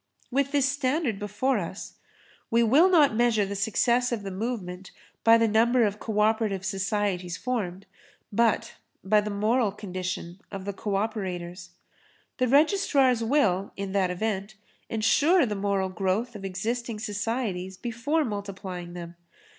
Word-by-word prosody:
With 275 Hz, +2 st, +1 dB
this 285 Hz, -2 st, +3 dB
standard 280 Hz, -4 st, 0 dB
before 210 Hz, +4 st, 0 dB
us, 185 Hz, +2 st, -7 dB, 0.5 s
we 235 Hz, +1 st, +3 dB
will 285 Hz, +11 st, +5 dB
not 300 Hz, -10 st, +5 dB
measure 230 Hz, -3 st, +3 dB
the 200 Hz, +1 st, -5 dB
success 235 Hz, +4 st, +1 dB
of 225 Hz, -4 st, -2 dB
the 195 Hz, -, -5 dB
movement 190 Hz, -3 st, -4 dB, 0.3 s
by 230 Hz, 0 st, +7 dB
the 230 Hz, 0 st, +3 dB
number 235 Hz, +3 st, +3 dB
of 210 Hz, -1 st, 0 dB
co 210 Hz, -2 st, -1 dB
operative 210 Hz, -3 st, +1 dB
societies 190 Hz, -2 st, -1 dB
formed, 200 Hz, -7 st, -3 dB, 0.5 s
but 230 Hz, +1 st, +1 dB, 0.3 s
by 210 Hz, +2 st, +4 dB
the 210 Hz, -, -4 dB
moral 215 Hz, +2 st, +1 dB
condition 185 Hz, -2 st, -5 dB
of 195 Hz, -1 st, -6 dB
the 200 Hz, -, -3 dB
co 200 Hz, +1 st, -3 dB
operators. 185 Hz, -4 st, -3 dB, 0.7 s
The 255 Hz, -, +2 dB
registrars 275 Hz, -, +3 dB
will, 215 Hz, -7 st, +1 dB
in 195 Hz, -1 st, -4 dB
that 190 Hz, -2 st, +1 dB
event, 200 Hz, +2 st, -3 dB, 0.3 s
ensure 290 Hz, +10 st, +3 dB
the 215 Hz, -, -2 dB
moral 195 Hz, -1 st, 0 dB
growth 195 Hz, +6 st, -1 dB
of 200 Hz, -, -8 dB
existing 220 Hz, +5 st, -3 dB
societies 205 Hz, -3 st, -3 dB
before 255 Hz, +8 st, -1 dB
multiplying 190 Hz, -5 st, -6 dB
them. 170 Hz, -1 st, -8 dB
210 Hz, 145 wpm, -27 LUFS, 190-240 Hz, 0.7 s, by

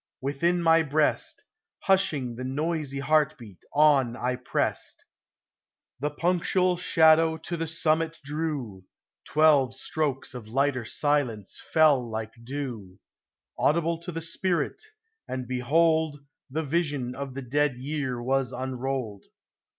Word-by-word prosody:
Within 170 Hz, +6 st, 0 dB
my 165 Hz, 0 st, +5 dB
breast 150 Hz, 0 st, 0 dB, 0.4 s
Hushing 155 Hz, -11 st, +1 dB
the 125 Hz, -, -6 dB
noisy 145 Hz, +1 st, -2 dB
heart 155 Hz, +1 st, +2 dB
beat, 105 Hz, -7 st, -13 dB
on 140 Hz, -5 st, +4 dB
I 125 Hz, 0 st, -1 dB
pressed. 125 Hz, 0 st, -2 dB, 0.9 s
The 145 Hz, +3 st, -1 dB
punctual 180 Hz, +3 st, +1 dB
shadow 160 Hz, -2 st, +4 dB
to 170 Hz, +2 st, -4 dB
the 165 Hz, -1 st, -3 dB
summit 165 Hz, 0 st, 0 dB
drew; 145 Hz, -, -4 dB, 0.4 s
Twelve 145 Hz, -4 st, +4 dB
strokes 140 Hz, -1 st, -2 dB
of 120 Hz, -4 st, -8 dB
lighter 130 Hz, 0 st, 0 dB
silence 125 Hz, -7 st, -1 dB
fell 155 Hz, -5 st, +5 dB
like 110 Hz, 0 st, -4 dB
dew, 120 Hz, -8 st, -6 dB, 0.6 s
Audible 165 Hz, +1 st, +2 dB
to 170 Hz, +1 st, -6 dB
the 165 Hz, 0 st, -4 dB
spirit, 170 Hz, -1 st, -1 dB, 0.5 s
and 130 Hz, -1 st, -4 dB
behold, 155 Hz, +4 st, +2 dB, 0.3 s
The 155 Hz, +4 st, -2 dB
vision 145 Hz, -5 st, -1 dB
of 135 Hz, 0 st, -6 dB
the 135 Hz, -, -5 dB
Dead 145 Hz, +1 st, +1 dB
Year 135 Hz, -2 st, -3 dB
was 135 Hz, 0 st, 0 dB
unrolled. 130 Hz, -4 st, -4 dB
145 Hz, 120 wpm, -27 LUFS, 130-160 Hz, 0.9 s, my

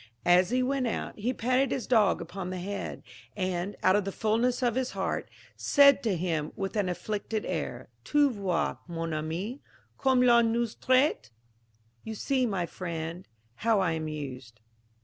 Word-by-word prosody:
As 180 Hz, +1 st, +5 dB
he 255 Hz, +1 st, +1 dB
went 265 Hz, -1 st, 0 dB
out, 225 Hz, -, -3 dB
he 235 Hz, +5 st, 0 dB
patted 255 Hz, +2 st, +1 dB
his 255 Hz, -, -2 dB
dog 220 Hz, -6 st, +3 dB
upon 185 Hz, -1 st, -6 dB
the 185 Hz, -, -4 dB
head, 200 Hz, +3 st, -5 dB, 0.3 s
and, 185 Hz, 0 st, -2 dB
out 185 Hz, -, +5 dB
of 205 Hz, -, +2 dB
the 195 Hz, -, -3 dB
fulness 230 Hz, +5 st, +1 dB
of 240 Hz, -2 st, +2 dB
his 255 Hz, +1 st, -2 dB
heart, -, -, -2 dB, 0.3 s
said 280 Hz, -2 st, +5 dB
to 215 Hz, -5 st, 0 dB
him 160 Hz, -3 st, -1 dB
with 195 Hz, +2 st, -4 dB
an 205 Hz, -3 st, +1 dB
afflicted 210 Hz, +3 st, -3 dB
air, 130 Hz, -8 st, -4 dB, 0.2 s
"Tu 290 Hz, -, +3 dB
vois, 195 Hz, -6 st, -1 dB
mon 165 Hz, -1 st, -3 dB
ami, 170 Hz, -, -3 dB, 0.4 s
comme 260 Hz, -2 st, +3 dB
l'on 235 Hz, -2 st, +5 dB
nous 235 Hz, -1 st, 0 dB
traite, 260 Hz, -, +2 dB, 0.7 s
You 220 Hz, -, -6 dB
see, 260 Hz, +2 st, +1 dB
my 190 Hz, -5 st, -1 dB
friend, 170 Hz, 0 st, -5 dB, 0.3 s
how 225 Hz, -2 st, +2 dB
I 185 Hz, -3 st, +2 dB
am 160 Hz, -1 st, -2 dB
used." 130 Hz, -6 st, -7 dB
205 Hz, 170 wpm, -28 LUFS, 175-245 Hz, 0.7 s, As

